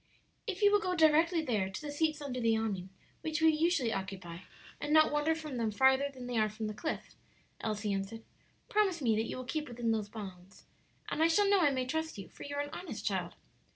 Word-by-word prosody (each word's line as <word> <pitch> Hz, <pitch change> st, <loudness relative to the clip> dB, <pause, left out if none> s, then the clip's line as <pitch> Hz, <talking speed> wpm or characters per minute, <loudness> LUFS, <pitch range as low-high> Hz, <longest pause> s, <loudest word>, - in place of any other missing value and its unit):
"If 405 Hz, -1 st, -3 dB
you 405 Hz, -, +7 dB
will 415 Hz, -, +5 dB
go 365 Hz, -3 st, -1 dB
directly 325 Hz, +1 st, +4 dB
there, 210 Hz, -9 st, 0 dB
to 190 Hz, -, -6 dB
the 300 Hz, -1 st, -5 dB
seats 305 Hz, 0 st, 0 dB
under 255 Hz, -3 st, -3 dB
the 225 Hz, -2 st, +3 dB
awning 200 Hz, -4 st, -2 dB, 0.3 s
which 315 Hz, 0 st, -2 dB
we 320 Hz, 0 st, +6 dB
usually 310 Hz, -7 st, +2 dB
occupy, 185 Hz, -3 st, -5 dB, 0.4 s
and 295 Hz, -, -3 dB
not 310 Hz, 0 st, +6 dB
wander 295 Hz, +2 st, +2 dB
from 305 Hz, -5 st, -6 dB
them 230 Hz, -2 st, 0 dB
farther 265 Hz, +5 st, +4 dB
than 255 Hz, -2 st, -9 dB
they 245 Hz, -2 st, -1 dB
are 215 Hz, 0 st, +3 dB
from 215 Hz, +1 st, -5 dB
the 215 Hz, -, -3 dB
cliff," 315 Hz, +9 st, -4 dB, 0.5 s
Elsie 210 Hz, -2 st, -2 dB
answered. 195 Hz, +3 st, -4 dB, 0.4 s
"Promise 390 Hz, -7 st, +1 dB
me 225 Hz, -3 st, +3 dB
that 220 Hz, +1 st, -1 dB
you -, -, -4 dB
will 255 Hz, -, -5 dB
keep 300 Hz, +4 st, -3 dB
within 240 Hz, -1 st, -1 dB
those 215 Hz, -2 st, -1 dB
bounds, 190 Hz, -3 st, -10 dB, 0.4 s
and -, -, -1 dB
I 325 Hz, -, +6 dB
shall 400 Hz, +5 st, +4 dB
know 400 Hz, 0 st, +5 dB
I 300 Hz, -, +5 dB
may 260 Hz, -2 st, -1 dB
trust 320 Hz, +2 st, -2 dB
you; 195 Hz, -, -8 dB
for -, -, -16 dB
you 285 Hz, 0 st, -5 dB
are 285 Hz, -, 0 dB
an 290 Hz, -, -8 dB
honest 360 Hz, -, -6 dB
child." -, -, -1 dB
265 Hz, 230 wpm, -32 LUFS, 220-320 Hz, 0.5 s, you